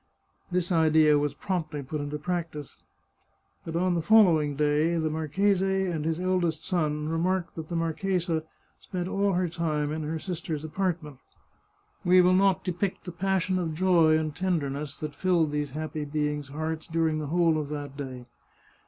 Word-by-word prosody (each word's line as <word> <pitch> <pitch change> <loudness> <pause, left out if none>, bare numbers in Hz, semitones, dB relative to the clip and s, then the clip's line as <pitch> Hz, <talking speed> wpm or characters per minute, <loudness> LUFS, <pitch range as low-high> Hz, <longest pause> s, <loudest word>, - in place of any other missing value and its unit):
This 180 0 0
idea 155 -2 +5
was 145 -1 -1
promptly 160 -6 -3
put 145 +3 -4
into 145 +1 -4
practice. 160 -2 -4 0.9
But 165 - -6
on 180 +1 +2
the 170 - 0
following 165 -8 +5
day 150 +3 +2
the 160 -1 0
marchese 190 +5 +1
and 155 -2 -3
his 165 +1 -1
eldest 175 -4 0
son 150 -4 0
remarked 175 +3 0
that 160 -1 -7
the 170 - -3
marchesa 165 0 -1 0.4
spent 180 -2 -4
all 200 +1 +1
her 180 0 +1
time 155 -3 -1
in 155 +1 -3
her 155 +2 -3
sister 170 -1 -4
in - - 0
law's 150 - -8
apart 175 +1 -1
ment. 150 -3 -10 0.9
We 180 0 +5
will 180 0 +5
not 195 0 +3
depict 180 +2 -2
the 180 - -6
passion 185 +1 0
of 160 -3 -2
joy 165 -3 +4
and 155 -2 -2
tenderness 150 -5 -2
that 150 -1 -5
filled 175 -5 +1
these 150 -1 -1
happy 155 +2 -4
beings' 150 -1 -2
hearts 155 +2 -4
during 160 -2 0
the 150 - -4
whole 165 0 +2
of 145 -2 -4
that 145 -2 -5
day. 130 -3 -7
160 Hz, 175 wpm, -27 LUFS, 150-180 Hz, 0.9 s, idea